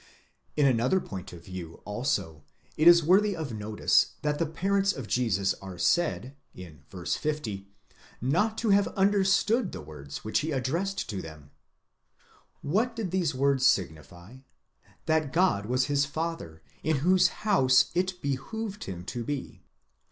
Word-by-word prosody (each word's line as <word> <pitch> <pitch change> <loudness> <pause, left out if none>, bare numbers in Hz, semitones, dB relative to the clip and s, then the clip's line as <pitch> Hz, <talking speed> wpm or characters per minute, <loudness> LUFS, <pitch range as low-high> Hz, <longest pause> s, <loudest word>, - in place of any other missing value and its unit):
In 145 - +4
another 130 +7 +3
point 95 - -8
of 85 -1 -12
view 90 -3 -8
also, 105 - -2 0.3
it 155 - +3
is 170 -1 +8
worthy 195 +5 +4
of 155 -7 -5
notice 105 0 +1
that 150 0 0
the 165 - +1
parents 195 +5 +1
of 135 - -7
Jesus 105 -5 +1
are 95 -2 -8
said 140 - 0 0.2
(v. 90 -1 -9 0.2
50) 100 - -3 0.5
not 175 - +1
to 225 -3 +1
have 200 0 +4
understood 200 +3 +2
the - - -7
words 70 -2 -9
which 110 - 0
he 155 +2 -3
addressed 165 +9 -2
to 100 -4 -4
them, 75 -3 -12 1.1
What 225 - 0
did 215 -6 -4
these 175 -7 0
words 135 0 +2
signify? 90 - -1 0.7
That 155 -3 +1
God 165 - +2
was 125 +2 +1
his 145 -1 +1
Father, 155 - -5 0.2
in 155 -2 +1
whose 185 0 +5
house 135 -12 +3
it 180 0 -1
behoved 200 - -4
him 90 -2 -7
to 120 +4 -4
be. 140 +2 -5
140 Hz, 145 wpm, -28 LUFS, -, 1.1 s, is